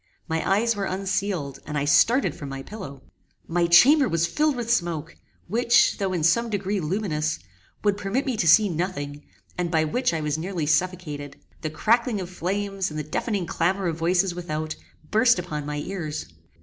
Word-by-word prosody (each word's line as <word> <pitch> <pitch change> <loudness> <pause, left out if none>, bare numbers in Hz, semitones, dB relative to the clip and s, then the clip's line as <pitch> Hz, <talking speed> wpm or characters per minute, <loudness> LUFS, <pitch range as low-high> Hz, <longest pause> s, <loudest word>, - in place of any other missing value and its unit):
My 160 -1 -1
eyes 225 +3 +2
were 200 -1 -2
unsealed, 185 -7 -2
and 150 - -3
I 140 - 0
started 150 - +4
from 145 - -8
my 135 0 -6
pillow. 140 -10 -9 0.4
My 170 0 +1
chamber 265 - +6
was 165 0 +1
filled 300 - +1
with 235 -1 0
smoke, 165 -6 -2 0.3
which, 235 +1 +3
though 195 -2 0
in 175 -4 -1
some 230 +9 +3
degree 200 -1 -1
luminous, 155 -3 -1 0.5
would 205 -1 +2
permit 205 +7 -1
me 260 -3 -1
to 170 - +1
see 210 +6 +7
nothing, 155 -5 -3 0.4
and 175 -1 0
by 160 -2 +2
which 205 +11 0
I 165 -2 -2
was 150 0 -1
nearly 175 -2 -3
suffocated. 155 -4 -1 0.3
The 155 - -2
crackling 225 +7 +1
of 185 -1 -6
flames, 195 +2 -2
and 155 - -7
the 150 - -2
deafening 185 - -2
clamour 185 +4 0
of 160 - -4
voices 175 +2 +2
without, 155 -3 -4 0.4
burst 230 +1 +5
upon 150 -5 -4
my 150 0 -3
ears. 155 - -4
175 Hz, 180 wpm, -25 LUFS, 155-205 Hz, 0.5 s, see